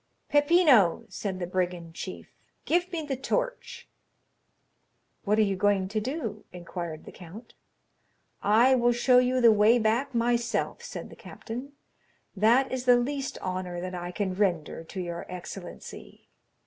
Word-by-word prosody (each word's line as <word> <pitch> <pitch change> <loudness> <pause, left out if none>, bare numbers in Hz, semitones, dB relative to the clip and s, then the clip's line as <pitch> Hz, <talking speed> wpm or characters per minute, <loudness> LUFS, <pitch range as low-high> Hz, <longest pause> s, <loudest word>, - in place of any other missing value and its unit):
"Peppino," 290 - +4
said 195 -3 -4
the 180 - -3
brigand 175 -2 -3
chief, 185 - -8 0.3
"give 355 +2 +1
me 330 -3 -3
the 275 -2 -2
torch." - - -3 1.4
"What 210 +1 +2
are 220 - +5
you 200 -2 0
going 195 0 +1
to 215 +2 -1
do?" 260 -1 -4
inquired 170 -2 -7
the - - -10
count. 195 +7 -12 0.9
"I 230 +6 +5
will 240 -1 +3
show 250 +1 +4
you 255 +1 +2
the 235 -2 +7
way 215 +3 +5
back 235 +4 0
myself," 235 0 0
said - - -8
the - - -11
captain; 250 +5 -8 0.6
"that 230 +7 +3
is 260 -1 -3
the 245 -1 +6
least 275 +2 -2
honor 185 -1 -3
that 185 +1 -5
I 175 0 -5
can 190 0 -2
render 175 -5 -1
to 190 - -7
your 175 -1 -5
excellency." 180 +1 -9
215 Hz, 150 wpm, -27 LUFS, 185-255 Hz, 1.4 s, the